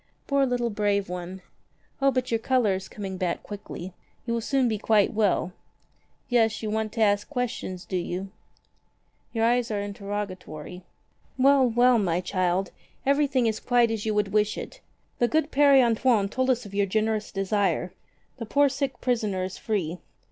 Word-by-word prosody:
"Poor 280 -1 +2
little 245 -2 -1
brave 205 -2 0
one! 180 +1 -6 0.6
O 275 - +5
but 255 -2 -1
your 225 - +2
color 240 -4 +2
is 190 0 -4
coming 195 -3 -6
back 180 -2 -2
quickly. 195 -3 -8 0.3
You 235 - -1
will 230 - -1
soon 265 +2 +1
be 215 -3 -1
quite 215 -1 +3
well. 200 -4 +1 0.7
Yes, 230 -4 +2
you 215 - -2
want 220 0 -1
to 225 - -2
ask 205 -1 +2
questions, 235 -9 -4
do 185 - -2
you? 180 +2 -4 1.0
Your 225 -1 +1
eyes 240 0 +2
are 210 -2 -1
interrogatory. 200 -5 -6 0.6
Well, 270 0 +5
well, 240 +1 +4
my 175 -4 +1
child, 185 0 -1 0.3
everything 280 -2 +2
is 220 -1 0
quite 240 -2 +2
as 220 -2 -3
you 215 -1 -1
would 210 -1 +1
wish 210 0 +2
it. - - -8 0.4
The 240 - +3
good 310 +3 0
Pere 280 -1 +6
Antoine 230 -3 +2
told 260 +4 0
us 250 -2 +1
of 200 - -11
your 200 0 +1
generous 215 +1 -1
desire. 195 -2 0 0.4
The 230 -3 -6
poor 285 +4 +4
sick 270 -2 -3
prisoner 215 -7 0
is 185 0 -5
free. 180 -6 -2
215 Hz, 170 wpm, -26 LUFS, 195-245 Hz, 1.0 s, Pere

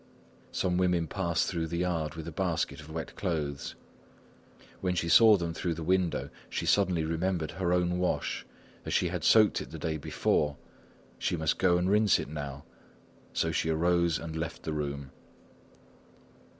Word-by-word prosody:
Some 90 -1 0
women 90 -2 +2
passed 85 -1 0
through 85 -3 -2
the 85 +1 -3
yard 85 -4 -1
with 80 0 -7
a - - -4
basket 85 -1 -1
of 80 0 -11
wet 80 0 -6
clothes. 75 -7 -3 1.0
When 90 -1 -1
she 85 - 0
saw 110 +4 +7
them 85 -2 -3
through 85 0 -2
the 80 - -5
window, 90 0 0 0.2
she - - -3
suddenly 95 -5 +3
remembered 85 0 -1
her 90 -2 -1
own 90 0 +1
wash; 90 - -1 0.4
as - - -2
she - - +2
had - - -4
soaked 110 -2 +5
it - - -8
the - - -7
day 80 -1 -2
before, 75 0 0 0.6
she 90 - 0
must 80 -1 0
go 90 -2 +4
and 90 +1 0
rinse 105 0 +4
it - - -5
now. 70 -2 -6 0.7
So 80 - 0
she 80 - 0
arose 85 0 +2
and 80 +1 -6
left 80 0 -4
the 80 - -3
room. 70 -2 -4
85 Hz, 170 wpm, -30 LUFS, 80-90 Hz, 1.0 s, saw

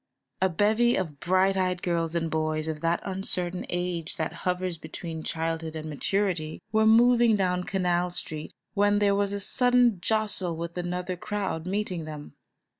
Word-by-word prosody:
A 190 - +4
bevy 215 +7 +3
of 155 -7 -3
bright 185 +3 +2
eyed 185 -1 0
girls 170 -1 -1
and 165 -1 -1
boys 155 0 -1
of 155 -1 -4
that 170 +1 +1
uncertain 185 -2 -1
age 175 -2 -3
that 155 - -2 0.2
hovers 180 -2 -2
between 160 0 -6
childhood 160 0 -3
and 155 0 -5
maturity, 165 +1 -1
were 220 0 +4
moving 235 0 +6
down 180 -2 0
Canal 180 -2 0
Street 155 -3 -5 0.2
when 205 0 +3
there 205 -1 +3
was 200 0 +1
a 200 - -2
sudden 245 -1 +4
jostle 205 -5 0
with 170 +1 -5
another 180 +1 -3
crowd 185 -3 -3
meeting 185 -4 -2
them. 150 -1 -8
180 Hz, 160 wpm, -27 LUFS, 165-200 Hz, 0.2 s, moving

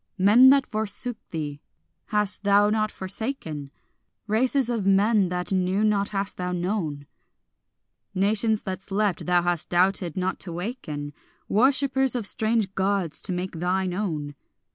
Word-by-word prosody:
Men 215 +7 +7
that 275 0 +5
forsook 220 +2 -3
thee 145 -3 -5 0.5
hast 210 -1 0
thou 205 +1 +4
not 215 0 +1
forsaken, 185 - -5 0.6
Races 250 +4 +1
of 235 -4 -1
men 195 0 +3
that 180 +1 -3
knew 190 +2 +1
not 205 -2 +1
hast 200 -1 -3
thou 180 0 -3
known; 175 -5 -2 1.1
Nations 215 +3 +1
that 190 -1 -4
slept 200 -2 -1
thou 175 -1 +3
hast 175 -2 +1
doubted 180 -1 +1
not 185 0 -1
to 180 - -5
waken, 165 - -5 0.3
Worshippers 265 +3 +2
of 235 -4 -2
strange 220 -2 +1
Gods 195 -4 -1
to - - -2
make 180 +1 -3
thine 180 +2 -1
own. 160 -7 -3
195 Hz, 140 wpm, -25 LUFS, 180-215 Hz, 1.1 s, Men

